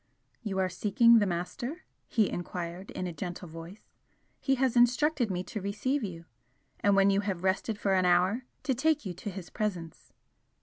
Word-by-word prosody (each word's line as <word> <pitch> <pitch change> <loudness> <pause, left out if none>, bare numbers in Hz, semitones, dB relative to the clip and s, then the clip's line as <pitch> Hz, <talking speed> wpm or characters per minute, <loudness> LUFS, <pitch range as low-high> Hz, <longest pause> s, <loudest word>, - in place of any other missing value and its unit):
"You 205 -5 -3
are 190 -1 +2
seeking 220 +5 +4
the 205 - +2
Master?" 240 - -4 0.2
he 220 -4 +2
enquired, 175 +1 -5
in 185 - -4
a 175 - -4
gentle 180 +1 -6
voice 165 +5 -11 0.5
"He 270 - +1
has 260 -2 +1
instructed 245 +1 +3
me 180 -1 -2
to 205 +3 -6
receive 220 +8 -1
you, 170 -4 -6 0.5
and 200 -1 +3
when 195 0 +5
you 195 - +2
have 195 -4 -3
rested 195 +3 0
for 200 -2 +1
an 185 -1 +3
hour, 185 +7 +3 0.2
to 270 - +1
take 300 +2 +1
you 185 - -3
to 185 +4 -6
his 190 -2 -8
presence." 185 -7 -4
195 Hz, 180 wpm, -29 LUFS, 180-235 Hz, 0.5 s, when